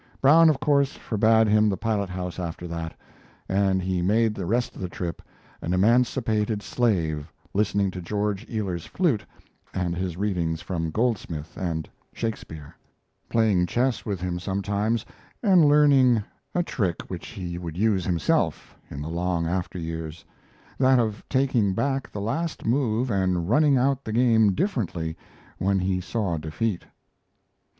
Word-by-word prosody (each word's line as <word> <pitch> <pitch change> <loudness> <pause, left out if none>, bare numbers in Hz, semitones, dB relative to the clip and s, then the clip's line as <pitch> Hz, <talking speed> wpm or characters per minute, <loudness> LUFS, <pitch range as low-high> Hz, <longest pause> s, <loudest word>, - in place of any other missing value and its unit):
Brown, 160 +4 +7
of 145 -4 +1
course, 140 -2 +2
forbade 110 0 +3
him 105 0 +4
the 95 - -1
pilothouse 95 -5 -2
after 85 0 -5
that, 85 -1 -5 0.5
and 95 -1 +1
he 90 -1 0
spent 110 +3 +3
the 95 -4 -5
rest 120 +5 0
of - - -9
the 90 - -3
trip 90 -1 -5 0.4
"an 85 - -2
emancipated 110 0 +2
slave" 80 -10 0 0.2
listening 100 -1 +1
to 90 - -6
George 100 +2 -2
Ealer's 95 -7 -3
flute 155 - +1 0.5
and 90 -2 -1
his 90 -1 -3
readings 90 -5 -1
from 85 -2 -3
Goldsmith 85 -7 -2
and 80 -4 -3 0.3
Shakespeare; 80 -10 -5 0.5
playing 105 -6 +3
chess 125 +6 0
with 100 -4 -3
him 90 0 -3
sometimes, 100 +4 -1 0.4
and 185 -7 +6
learning 140 -6 +5 0.3
a 175 - +2
trick 95 - -1
which 90 -2 -6
he 85 -2 -6
would 85 -2 -6
use 100 -2 +2
himself 85 -4 0
in 70 0 -6
the - - -5
long 85 0 -1
after 90 +2 -2
years 80 -1 -5 0.5
that 130 0 +5
of 110 -3 0
taking 125 -8 +2
back 135 +2 -1
the 100 - -5
last 160 +10 -2
move 120 0 +1
and 95 -3 +1
running 145 +5 +4
out 135 +1 +1
the 110 - -5
game 110 -4 +4
differently 90 - -2 0.4
when 95 +1 +2
he 90 0 0
saw 95 -3 -2
defeat. 85 +6 -2
100 Hz, 145 wpm, -25 LUFS, 90-115 Hz, 0.5 s, Brown